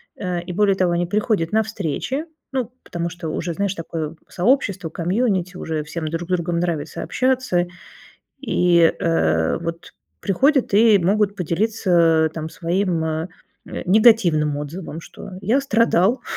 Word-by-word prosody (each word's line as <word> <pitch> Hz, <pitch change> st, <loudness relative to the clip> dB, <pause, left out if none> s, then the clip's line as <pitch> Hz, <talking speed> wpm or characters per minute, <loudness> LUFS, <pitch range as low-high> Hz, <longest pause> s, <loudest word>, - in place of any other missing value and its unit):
э, 180 Hz, -3 st, -3 dB
и, 180 Hz, +1 st, -6 dB
более 200 Hz, +1 st, +3 dB
того, 185 Hz, -2 st, +1 dB
они 175 Hz, +1 st, +1 dB
приходят 200 Hz, -2 st, 0 dB
на 220 Hz, -, +3 dB
встречи, 220 Hz, -, -3 dB, 0.3 s
ну, 255 Hz, -3 st, -2 dB
потому 170 Hz, 0 st, -4 dB
что, 170 Hz, -1 st, -6 dB
уже 170 Hz, +2 st, -3 dB
знаешь, 200 Hz, +2 st, -1 dB
такое 165 Hz, -2 st, -5 dB
сообщество, 195 Hz, -4 st, 0 dB
комьюнити, 185 Hz, +1 st, -1 dB
уже 160 Hz, -3 st, -3 dB
всем 155 Hz, +1 st, -5 dB
друг 165 Hz, +2 st, -4 dB
другом 170 Hz, -1 st, 0 dB
нравится 165 Hz, -3 st, -3 dB
общаться, 255 Hz, -9 st, 0 dB, 0.7 s
и, 175 Hz, -9 st, +3 dB
э, 80 Hz, -, +1 dB
вот 165 Hz, 0 st, -6 dB, 0.3 s
приходят 265 Hz, -, +2 dB
и 215 Hz, 0 st, +6 dB
могут 200 Hz, +3 st, +1 dB
поделиться 170 Hz, -3 st, +2 dB
там 160 Hz, -1 st, -4 dB
своим, 175 Hz, -1 st, -1 dB
э, 160 Hz, +2 st, -2 dB, 0.4 s
э, -, -, -6 dB
негативным 180 Hz, -8 st, +4 dB
отзывом, 155 Hz, +3 st, -6 dB
что: -, -, -11 dB
"Я 220 Hz, +8 st, +2 dB
страдал". 230 Hz, -3 st, +2 dB
175 Hz, 140 wpm, -21 LUFS, 165-210 Hz, 0.7 s, и